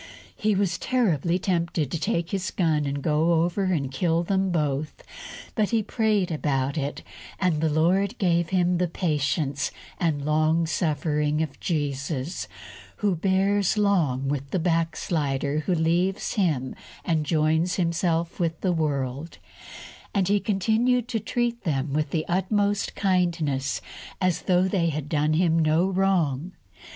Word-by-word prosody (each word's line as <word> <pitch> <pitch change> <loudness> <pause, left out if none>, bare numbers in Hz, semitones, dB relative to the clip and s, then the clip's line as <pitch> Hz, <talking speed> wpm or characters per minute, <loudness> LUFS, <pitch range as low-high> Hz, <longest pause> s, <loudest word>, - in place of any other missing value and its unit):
He 215 -1 +1
was 185 -3 0
terribly 180 - +1
tempted 170 -5 -1
to 165 - -2
take 170 +2 -1
his 190 -2 -1
gun 155 -5 +1
and 140 0 -3
go 160 +2 +2
over 175 +3 -1
and 150 -8 0
kill 165 +4 +1
them 190 +1 0
both. 150 -3 -2 0.5
But 215 -3 +1
he 225 -2 +1
prayed 210 -5 +1
about 140 -3 -1
it, 145 -2 -3 0.4
and 170 -5 +1
the 160 - +2
Lord 185 +8 +2
gave 170 -3 +1
him 180 -2 +2
the 180 - +2
patience 145 -4 -1 0.3
and 150 -5 0
long 155 +2 +2
suffering 150 -1 0
of 145 -3 -7
Jesus, 145 -1 -2 0.5
who 205 -3 0
bears 195 +3 +1
long 165 -11 +2
with 140 -1 -2
the 185 - -1
backslider 160 -4 0
who 180 - +2
leaves 175 +4 0
Him 155 - 0 0.3
and 160 -3 +1
joins 160 +3 +1
himself 170 -1 0
with 165 -2 -1
the 185 -2 +1
world; 145 -1 -2 0.8
and 195 -2 +2
he 205 0 +3
continued 225 +5 +1
to 230 -3 -1
treat 240 +2 -2
them 140 -3 -1
with 150 0 0
the 155 +2 -1
utmost 200 +3 0
kindness, 170 -8 0 0.4
as 185 -3 +1
though 185 0 +2
they 180 -3 +1
had 150 -2 -4
done 150 0 +1
him 165 0 +3
no 160 +2 +3
wrong. 185 -5 0
165 Hz, 145 wpm, -25 LUFS, 150-190 Hz, 0.8 s, he